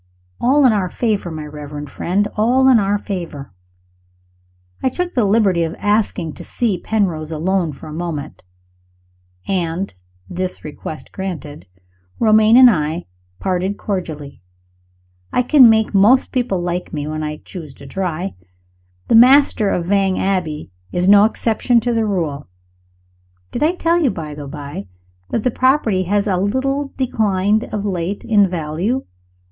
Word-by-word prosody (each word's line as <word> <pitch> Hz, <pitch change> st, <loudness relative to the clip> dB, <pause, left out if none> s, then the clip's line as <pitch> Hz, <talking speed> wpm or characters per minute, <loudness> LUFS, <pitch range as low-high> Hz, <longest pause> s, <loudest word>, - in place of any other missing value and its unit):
All 275 Hz, +3 st, +3 dB
in 245 Hz, -, +5 dB
our 190 Hz, -4 st, 0 dB
favor, 210 Hz, -5 st, -1 dB
my 155 Hz, -2 st, -6 dB
reverend 150 Hz, 0 st, -8 dB
friend 200 Hz, +4 st, 0 dB
all 250 Hz, +5 st, +3 dB
in 255 Hz, -3 st, +6 dB
our 200 Hz, 0 st, +1 dB
favor! 170 Hz, -, -6 dB, 1.3 s
I -, -, +2 dB
took 355 Hz, +6 st, -3 dB
the 240 Hz, -5 st, +2 dB
liberty 200 Hz, -4 st, +2 dB
of 165 Hz, 0 st, -2 dB
asking 205 Hz, -6 st, 0 dB
to -, -, -10 dB
see 215 Hz, -7 st, -1 dB
Penrose 175 Hz, -8 st, -1 dB
alone 170 Hz, +1 st, -1 dB
for 145 Hz, -, -12 dB
a 155 Hz, -, -8 dB
moment; 155 Hz, -3 st, -5 dB, 1.1 s
and, 180 Hz, 0 st, -2 dB, 0.3 s
this 185 Hz, +1 st, -4 dB
request 155 Hz, +1 st, -8 dB
granted, 155 Hz, -, -6 dB, 0.5 s
Romayne 220 Hz, +1 st, +5 dB
and 255 Hz, 0 st, +9 dB
I 160 Hz, -5 st, 0 dB, 0.3 s
parted 190 Hz, +1 st, -1 dB
cordially. 155 Hz, -, -5 dB, 0.9 s
I 250 Hz, -, +2 dB
can 255 Hz, -2 st, +7 dB
make 220 Hz, -1 st, +2 dB
most 210 Hz, +7 st, +4 dB
people 240 Hz, -7 st, -1 dB
like 175 Hz, +1 st, -3 dB
me, 145 Hz, -2 st, -4 dB
when 155 Hz, +1 st, -4 dB
I 150 Hz, 0 st, -4 dB
choose 160 Hz, -5 st, -10 dB
to -, -, -13 dB
try. 180 Hz, +4 st, -3 dB, 0.7 s
The -, -, +1 dB
master 245 Hz, -2 st, +6 dB
of 175 Hz, -, -1 dB
Vange 195 Hz, 0 st, +1 dB
Abbey 170 Hz, -, -2 dB, 0.2 s
is 180 Hz, +1 st, 0 dB
no 205 Hz, +1 st, +7 dB
exception 230 Hz, +2 st, +1 dB
to 240 Hz, 0 st, -1 dB
the 225 Hz, -1 st, +1 dB
rule. 160 Hz, -8 st, -2 dB, 1.0 s
Did -, -, -4 dB
I 320 Hz, +4 st, +2 dB
tell 340 Hz, 0 st, +1 dB
you, 285 Hz, -, +3 dB
by 160 Hz, -6 st, -6 dB
the 145 Hz, -1 st, -8 dB
by, 140 Hz, -8 st, -7 dB, 0.4 s
that 230 Hz, -, -1 dB
the 250 Hz, -, +1 dB
property 235 Hz, -8 st, +2 dB
has 200 Hz, +2 st, +1 dB
a 195 Hz, -4 st, 0 dB
little 270 Hz, +8 st, -1 dB
declined 215 Hz, -4 st, +1 dB
of 210 Hz, -1 st, -4 dB
late 185 Hz, 0 st, -3 dB
in 205 Hz, -4 st, +3 dB
value? 175 Hz, +9 st, -2 dB
195 Hz, 150 wpm, -18 LUFS, 165-225 Hz, 1.3 s, and